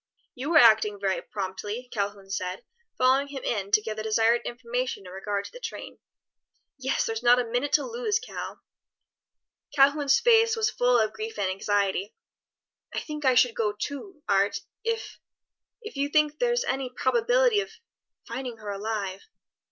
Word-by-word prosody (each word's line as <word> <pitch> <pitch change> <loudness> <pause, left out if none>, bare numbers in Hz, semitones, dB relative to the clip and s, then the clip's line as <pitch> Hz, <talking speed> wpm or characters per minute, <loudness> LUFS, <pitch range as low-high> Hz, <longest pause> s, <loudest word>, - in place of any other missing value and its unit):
"You 270 +6 -4
are - - +9
acting 215 -5 +6
very 195 -1 0
promptly," 205 +5 -5
Calhoun 200 -2 -3
said, 185 -1 -4 0.3
following 265 +2 +3
him 275 -2 -7
in 200 -4 -2
to 210 +1 +4
give 215 0 -5
the - - -3
desired 225 +2 +2
information 245 -3 -3
in 180 - -10
regard 200 +1 -3
to - - -9
the - - -11
train. - - -7 0.8
"Yes, 265 +1 0
there's 225 0 -3
not 245 0 +6
a 250 - +2
minute 245 +5 -1
to 295 - +4
lose, 465 -3 -1
Cal." 470 - -7 1.1
Calhoun's 285 +4 +4
face 455 -1 +5
was 445 -1 +1
full 245 0 +3
of 215 -1 +1
grief 220 0 -6
and 195 -2 0
anxiety. 200 0 -1 0.8
"I - - -2
think 300 -2 -6
I 260 -1 +5
should 245 -1 +5
go, 215 -3 0
too, 295 - -6
Art, 200 0 +2 0.2
if 455 0 -3 0.6
if 435 - -8
you 280 +1 -1
think 300 0 +2
there's 485 0 +2
any 265 - -2
probability 480 - +2
of 410 +1 -3 0.6
finding 245 0 -5
her 210 -2 -6
alive." 200 -2 -3
245 Hz, 165 wpm, -27 LUFS, 205-295 Hz, 1.1 s, are